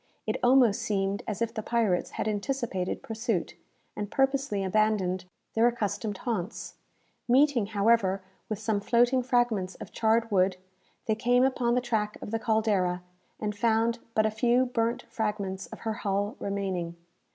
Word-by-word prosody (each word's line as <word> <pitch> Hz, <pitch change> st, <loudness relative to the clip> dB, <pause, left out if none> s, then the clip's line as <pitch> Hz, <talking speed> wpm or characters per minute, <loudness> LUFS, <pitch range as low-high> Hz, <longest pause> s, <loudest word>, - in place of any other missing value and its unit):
It -, -, -1 dB
almost 245 Hz, -4 st, +5 dB
seemed 195 Hz, -1 st, -1 dB
as 215 Hz, +1 st, -1 dB
if 230 Hz, 0 st, -3 dB
the 220 Hz, -, -3 dB
pirates 215 Hz, -6 st, +1 dB
had -, -, -1 dB
anticipated 210 Hz, -3 st, -2 dB
pursuit, 225 Hz, -4 st, -2 dB, 0.4 s
and 205 Hz, -1 st, -4 dB
purposely 270 Hz, -6 st, +1 dB
abandoned 190 Hz, -2 st, +1 dB, 0.3 s
their 225 Hz, +1 st, +4 dB
accustomed 215 Hz, -3 st, -2 dB
haunts. 225 Hz, -4 st, -4 dB, 0.5 s
Meeting, 255 Hz, -3 st, +4 dB
however, 200 Hz, -2 st, +2 dB, 0.3 s
with 215 Hz, -, -2 dB
some 215 Hz, 0 st, 0 dB
floating 240 Hz, +5 st, +3 dB
fragments 240 Hz, -7 st, +1 dB
of -, -, -10 dB
charred 230 Hz, 0 st, +1 dB
wood, 185 Hz, -1 st, +3 dB, 0.5 s
they 220 Hz, -, +2 dB
came 245 Hz, +3 st, +3 dB
upon 250 Hz, -2 st, +2 dB
the 250 Hz, -, +2 dB
track 215 Hz, -3 st, -1 dB
of -, -, -7 dB
the 225 Hz, -, 0 dB
"Caldera," 205 Hz, -6 st, +1 dB, 0.4 s
and 210 Hz, -1 st, -2 dB
found 230 Hz, +1 st, +2 dB, 0.2 s
but 215 Hz, -, +4 dB
a 220 Hz, -, +2 dB
few 240 Hz, +4 st, +3 dB
burnt 240 Hz, 0 st, -1 dB
fragments 205 Hz, -3 st, -3 dB
of -, -, -11 dB
her 220 Hz, -1 st, -2 dB
hull 205 Hz, -1 st, -1 dB
remaining. 190 Hz, -4 st, -2 dB
220 Hz, 150 wpm, -28 LUFS, 200-235 Hz, 0.5 s, almost